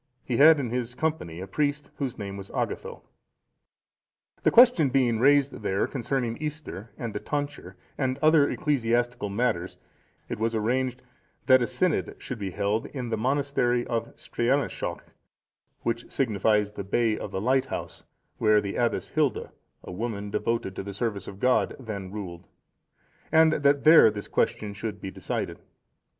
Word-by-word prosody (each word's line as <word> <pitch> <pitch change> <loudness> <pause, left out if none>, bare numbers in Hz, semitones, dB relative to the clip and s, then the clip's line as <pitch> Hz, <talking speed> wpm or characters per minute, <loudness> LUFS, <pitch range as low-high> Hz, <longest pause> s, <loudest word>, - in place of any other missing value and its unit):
He 120 - -2
had 155 +2 +7
in 125 -5 -3
his 120 -1 -3
company 125 - -2
a - - -4
priest, 145 +6 -1
whose 135 -4 -3
name 100 -2 -5
was 100 -1 -8
Agatho.(464) - - -3 1.4
The - - +4
question 235 - +6
being 125 -4 +2
raised 140 +1 +3
there 100 -1 0
concerning 125 -2 -2
Easter 150 -8 -6
and 115 -3 -5
the 105 - -3
tonsure 145 -11 -4 0.2
and 130 -2 0
other 155 -1 +4
ecclesiastical 120 -5 0
matters, 100 -4 -1 0.5
it - - -5
was 115 +1 0
arranged, 125 +3 -1 0.4
that 130 -1 +6
a 120 - +1
synod 150 +7 0
should 125 -4 -7
be 100 -2 -3
held 100 +4 -1
in 125 -4 -5
the 115 - 0
monastery 125 0 0
of 115 -1 -3
Streanaeshalch,(465) 130 +3 -1 0.8
which 115 0 -3
signifies 105 -4 +1
the 100 - -6
Bay 110 +3 +1
of - - -6
the 95 - -3
Lighthouse, 130 +5 -1 0.4
where 110 -1 +5
the 100 -1 -4
Abbess 120 -1 0
Hilda,(466) 150 -4 0 0.3
a - - -8
woman 105 +1 -4
devoted 105 -3 -1
to - - -2
the 100 0 -7
service 100 -3 -3
of 95 - -9
God, 125 +2 +2
then 100 -7 -6
ruled; 90 -5 -7 0.8
and 160 0 +5
that 140 -1 +2
there 155 -6 +8
this 105 -1 -6
question 105 -1 -1
should 105 0 -5
be 95 - -6
decided. - - -4
120 Hz, 155 wpm, -26 LUFS, 105-135 Hz, 1.4 s, there